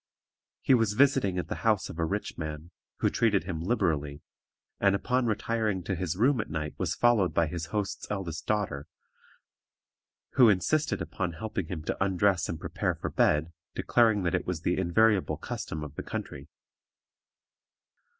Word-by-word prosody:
He - - +4
was 115 -4 +3
visiting 130 -7 +3
at 90 - -2
the - - -4
house 110 -3 +2
of 80 - -9
a 80 - +2
rich 100 +5 -3
man, 80 +1 -6 0.3
who - - +3
treated 105 -6 +2
him 85 -3 -4
liberally, 80 -8 -1 0.6
and 100 -1 +4
upon 125 +4 0
retiring 110 -3 -1
to 95 - -2
his 85 -1 -2
room 125 +2 +3
at - - -8
night 75 -1 -3
was - - -1
followed 115 -7 +3
by 85 - +4
his 85 +1 -4
host's 100 +3 -3
eldest 90 -6 -4
daughter, 100 -10 -1 1.4
who 125 -4 +6
insisted 125 - +1
upon 90 -3 -3
helping 95 0 -4
him 80 -3 -5
to 90 - -1
undress 95 -1 +2
and 80 - -4
prepare - - -2
for - - -5
bed, 80 +3 +2 0.2
declaring 110 -4 +3
that 85 - 0
it - - -1
was 90 -3 -2
the 90 - +1
invariable 100 +3 +2
custom 80 0 -5
of 75 -2 -7
the - - -5
country. 70 0 -6
95 Hz, 165 wpm, -28 LUFS, 80-110 Hz, 1.4 s, who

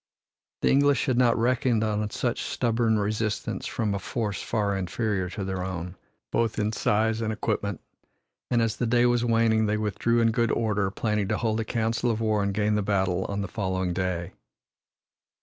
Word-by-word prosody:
The - - +4
English 140 -1 +3
had 130 -2 +1
not 120 -2 +4
reckoned 120 -1 +2
on 105 -1 -1
such 120 +3 -2
stubborn 120 -5 +1
resistance 105 +1 -2
from 105 -3 -1
a 100 - -2
force 105 -1 -3
far 105 -3 0
inferior 95 0 -1
to 100 - -5
their 95 -1 -3
own, 90 -1 -5 0.4
both 115 -1 0
in 105 0 0
size 110 +1 +1
and 110 -1 -1
equipment, 100 -3 -2 0.7
and 120 -2 +2
as 115 -1 -1
the 120 - 0
day 120 +1 +3
was 120 -1 +2
waning 115 -2 +3
they 105 +1 +1
withdrew 110 +3 0
in 115 -1 +3
good 115 0 +1
order, 105 -4 +1
planning 105 0 -1
to 110 0 0
hold 110 -1 0
a 110 - -2
council 115 +1 0
of 110 -1 0
war 110 -2 +1
and 100 -1 -1
gain 105 0 +1
the 105 - +1
battle 95 -2 0
on 100 0 -3
the 100 - -3
following 95 -2 -2
day. 90 -1 -2
110 Hz, 185 wpm, -26 LUFS, 100-115 Hz, 0.7 s, The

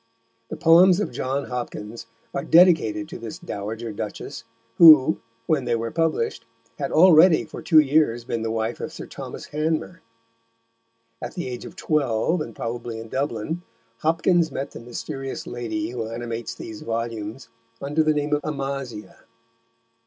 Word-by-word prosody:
The - - -5
poems 175 +3 +6
of 210 - -2
John 135 +2 -2
Hopkins 115 -2 -6 0.3
are 140 - -2
dedicated 160 - +4
to - - -8
this 115 -2 -7
Dowager 110 +3 -5
duchess, 105 +2 -6 0.3
who, 155 -3 +8 0.3
when 140 -3 +1
they 120 -1 +1
were 115 0 -3
published, 160 -8 -1 0.4
had 140 - -2
already 170 0 +6
for - - -9
two 160 - +3
years 145 -5 +4
been 115 - -3
the 115 - -2
wife 110 +1 -2
of - - -5
Sir - - -8
Thomas - - -9
Hanmer. 155 +3 -2 1.2
At - - -6
the 175 - -4
age 125 -1 -6
of - - -10
twelve, 150 +2 0
and 115 -7 -6
probably 115 -1 -5
in 115 0 -9
Dublin, 140 +5 -2 0.4
Hopkins 165 +1 +2
met 135 - -4
the - - -9
mysterious 130 +3 -6
lady 120 +5 -4
who 115 -3 -4
animates 115 0 -5
these 110 -1 -8
volumes 115 +1 -4 0.3
under 145 +3 0
the 155 -1 +2
name 150 0 -1
of 145 - +1
Amasia. 135 -8 -5
130 Hz, 150 wpm, -23 LUFS, 115-155 Hz, 1.2 s, who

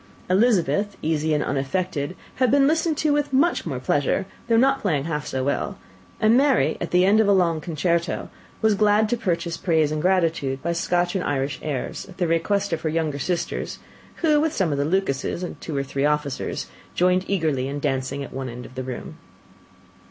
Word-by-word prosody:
Elizabeth, 205 -1 +2
easy 155 0 0
and 150 -1 +2
unaffected, 145 +3 -2 0.2
had 255 -1 +3
been 275 +2 +5
listened 320 +1 +1
to 300 -1 +2
with 290 -1 0
much 275 - +2
more 135 -5 -3
pleasure, 145 +7 0 0.2
though 230 -1 +3
not 270 +3 +3
playing 155 -9 0
half 150 -1 -3
so 130 -1 -2
well; 140 - -1 0.4
and 220 +2 +4
Mary, 255 - +3
at 175 - -2
the 180 +1 +4
end 205 +3 +5
of 220 - +4
a - - +5
long 170 -5 +2
concerto, 170 +1 -1 0.4
was 220 -1 +5
glad 210 +1 +3
to 240 - +1
purchase 170 -6 -2
praise 160 -5 +2
and 155 0 -1
gratitude 165 -7 +1
by 170 - 0
Scotch 175 +1 0
and 190 -2 -1
Irish 140 0 -1
airs, 145 -4 -4
at 185 - -13
the 180 - +1
request 195 +4 0
of 160 - -2
her 160 - -1
younger 155 -3 -1
sisters, 175 +5 -2 0.5
who 300 -2 +4
with 315 -1 0
some 185 -5 +1
of 140 - -1
the 140 - +1
Lucases, 170 -1 -1
and 180 - -6
two 155 -4 -4
or 140 - 0
three 135 0 -3
officers, 150 -2 -1 0.3
joined 180 +1 +3
eagerly 155 -9 0
in 140 +1 -4
dancing 135 -1 -2
at 140 - -9
one 130 -1 -4
end 125 +1 -8
of - - -12
the 130 - -4
room. 130 -1 -7
170 Hz, 200 wpm, -23 LUFS, 145-200 Hz, 0.5 s, been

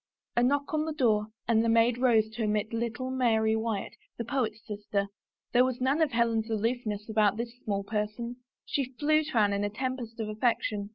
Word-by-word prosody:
A 240 - +3
knock 280 +4 +1
on 310 0 +1
the 320 - -2
door 220 -7 +2 0.2
and 225 -1 +4
the 230 - +1
maid 230 +1 +4
rose 230 -4 +4
to 225 +1 -3
admit 215 +1 0
little 235 +3 -2
Mary 220 -4 +2
Wyatt, 220 -2 -2 0.2
the 235 - -3
poet's 220 -4 -2
sister. 205 -1 -2 0.4
There 245 0 +5
was 255 -1 -1
none 270 +5 +2
of 310 -3 +3
Helen's 230 -1 +1
aloofness 220 -1 -1
about 215 -2 +2
this 235 0 -4
small 200 -2 -1
person; 215 +3 -3 0.3
she 265 -2 -2
flew 310 +1 +3
to 300 -5 -3
Anne 205 -2 +4
in 200 0 0
a 205 - 0
tempest 240 0 -4
of 220 - -2
affection. 215 -2 0
230 Hz, 195 wpm, -29 LUFS, 215-250 Hz, 0.4 s, There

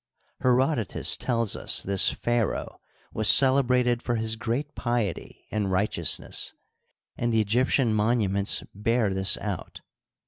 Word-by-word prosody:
Herodotus 130 - +1
tells 115 -4 -1
us - - -1
this 100 -1 +4
pharaoh 120 -3 -2 0.3
was 110 -1 +1
celebrated 125 -3 +4
for 120 - -2
his 110 0 +1
g^eat 120 +6 -3
piety 120 -6 -3
and 105 -3 -2
righteous 100 +3 +1
ness, - - -1 0.6
and 120 0 -1
the 110 - +2
Egyptian 120 +2 +1
monuments 105 -3 +1
bear 110 0 0
this 95 -1 +1
out. - - -6
115 Hz, 125 wpm, -26 LUFS, 105-125 Hz, 0.6 s, this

